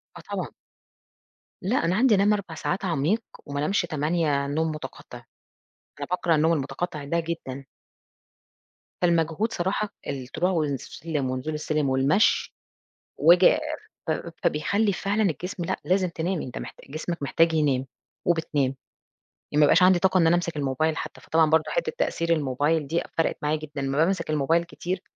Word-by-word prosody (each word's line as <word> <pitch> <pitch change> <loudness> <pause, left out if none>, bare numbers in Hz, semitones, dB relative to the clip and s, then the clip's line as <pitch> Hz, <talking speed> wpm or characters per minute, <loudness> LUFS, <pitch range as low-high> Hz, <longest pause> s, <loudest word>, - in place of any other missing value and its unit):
آه - - -9
طبعًا. - - -2 1.1
لأ، 200 -1 +1
أنا 175 +2 +1
عندي 240 -1 +5
أنام 200 +2 +4
4 195 -5 -4
ساعات 185 +4 -2
عميق، 170 +7 +1 0.2
وما 145 0 -4
أنامش 155 +7 +1
8 155 -3 0
نوم 160 +2 0
مُتَقَطِّع 155 - -9 0.8
أنا 140 - -4
باكره 175 -2 +2
النوم 160 +2 +3
المُتَقَطِّع 155 +1 -3
ده 170 +4 0
جدًا. 150 -5 -5 1.4
فالمجهود 170 +4 +1
صراحة 195 +4 -1 0.2
الطلوع 140 +7 -2
والسلم 150 -2 -2
ونزول 130 +4 -3
السلم 150 -1 -1
والمشي 195 - +2 0.6
وآجي 175 +4 +6 0.5
ف - - -1 0.3
فبيخلِّي 200 +8 +1
فعلًا 200 +3 0
الجسم 180 +1 -2
لأ، - - -1
لازم 185 0 +2
تنامي 170 +1 -2
أنت 125 - -6
محت - - -9
جسمك 155 +2 -4
محتاج 165 +4 +3
ينام، 140 -4 +1 0.4
وبتنام، 155 -6 +1 0.8
ي 150 - -1
ما 150 - +5
بيبقاش 165 +5 +6
عندي 185 -1 +6
طاقة 190 0 +3
إن 165 -3 +5
أنا 170 - +5
أمسك 170 -2 -2
الmobile 145 +3 0
حتى، - - -6
فطبعًا 160 -1 +3
برضه 160 0 +4
حِتّة - - 0
تَأثير 170 - -1
الmobile 145 +3 0
دي 170 +3 0
فَرَقِت 165 - +1
معايا 150 +1 +1
جدًا، 150 -2 -6
أمّا 135 +1 -1
بامسك 170 -2 0
الmobile 160 +3 +2
كتير، 180 +2 -4
165 Hz, 155 wpm, -25 LUFS, 150-180 Hz, 1.4 s, وآجي